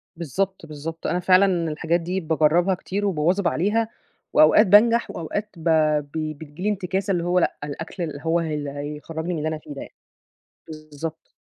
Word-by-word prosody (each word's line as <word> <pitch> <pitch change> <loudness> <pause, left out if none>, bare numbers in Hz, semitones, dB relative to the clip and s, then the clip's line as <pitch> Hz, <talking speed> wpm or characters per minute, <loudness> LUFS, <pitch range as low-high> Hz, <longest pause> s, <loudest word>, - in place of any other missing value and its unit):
بالضبط، 175 +4 -3
بالضبط. 160 +2 -6
أنا 180 - 0
فعلًا 185 +2 +5 0.3
الحاجات 165 +3 0
دي 180 +3 -2
باجربها 165 +3 +2
كتير 200 +3 -3
وباواظب 180 +1 +1
عليها، 210 +7 +1 0.4
وأوقات 190 +7 +6
بانجح 230 +4 +5
وأوقات 205 +6 -4
ب 160 - -11 0.4
ب 145 -1 -12 0.3
بتيجي 155 +3 -10
لي 210 - +2
انتكاسة 195 0 -1
اللي 175 -2 0
هو 180 +1 +2
لأ، - - 0
الأكل 160 +5 -5
اللي 150 -3 -5
هو 165 +1 +2
اللي 150 -3 -3
هيخرجني 150 +4 -5
من - - -2
اللي 155 +1 -2
أنا 160 - -3
في 150 -1 -10
ده 140 - -7
يعني. - - -11 0.7
بالضبط. 155 0 -8
165 Hz, 175 wpm, -23 LUFS, 155-190 Hz, 0.7 s, وأوقات